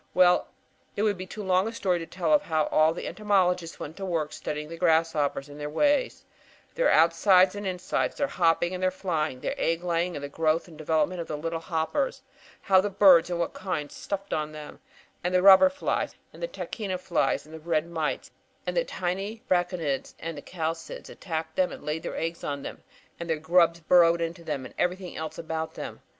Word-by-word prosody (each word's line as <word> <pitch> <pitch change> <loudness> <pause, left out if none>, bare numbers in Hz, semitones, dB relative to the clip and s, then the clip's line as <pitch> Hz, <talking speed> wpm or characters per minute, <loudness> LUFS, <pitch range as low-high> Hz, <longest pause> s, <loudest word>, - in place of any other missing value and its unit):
"Well, 180 -1 +5 0.5
it 205 - 0
would 210 -2 +2
be 185 - -6
too 210 +3 -7
long 185 +1 +2
a - - -3
story 190 -6 0
to 165 - -7
tell 170 -4 0
of 150 - +5
how 160 -2 0
all 155 +1 +5
the 165 - -6
entomologists 180 -5 0
went 155 - -7
to 195 - -6
work 165 -5 -2
studying 150 0 -4
the 165 - -7
grasshoppers 160 -4 +1
and 145 0 -11
their 150 0 -4
ways: 285 - +1 0.5
their - - +2
outsides 180 +3 +5
and 205 -1 -5
insides, 180 -1 -1
their 285 - 0
hopping 175 -4 +1
and 185 - -4
their 185 - +3
flying, 160 -8 -2
their - - -2
egg 165 +1 0
laying 175 0 0
and 145 - -6
the - - -3
growth 160 +3 0
and 165 - -13
development 160 +3 0
of 165 - -7
the 150 - -4
little 165 +2 -3
hoppers; 165 - -2 0.4
how 190 -1 +5
the 205 - -1
birds, 185 -4 +6
and 175 - -1
what 170 - -1
kinds, 180 -6 -4
stuffed 200 0 -4
on 155 0 -2
them, 150 -1 -9 0.4
and 180 +1 0
the 180 - +3
robber 195 +8 +9
flies 280 +1 -2 0.2
and - - -13
the - - -1
tachina 205 - -4
flies 175 -4 0
and 155 - -14
the 160 - -7
red 160 -1 0
mites 160 -3 -3 0.3
and - - -2
the - - +3
tiny 195 - -4
braconids 175 -6 -1
and 160 -3 -6
chalcids 165 -1 -5
attacked 160 -2 -5
them 185 -1 +2
and - - -9
laid 150 +2 -3
eggs 165 +1 -4
on 140 -1 -3
them, - - -7 0.4
and 170 0 -6
their 160 - +1
grubs 170 +1 +3
burrowed 170 +1 +5
into 170 +1 -4
them; 145 -5 -4
and - - -10
everything 180 0 -1
else 160 0 -5
about 160 0 -4
them. - - -7
170 Hz, 205 wpm, -27 LUFS, 160-185 Hz, 0.5 s, robber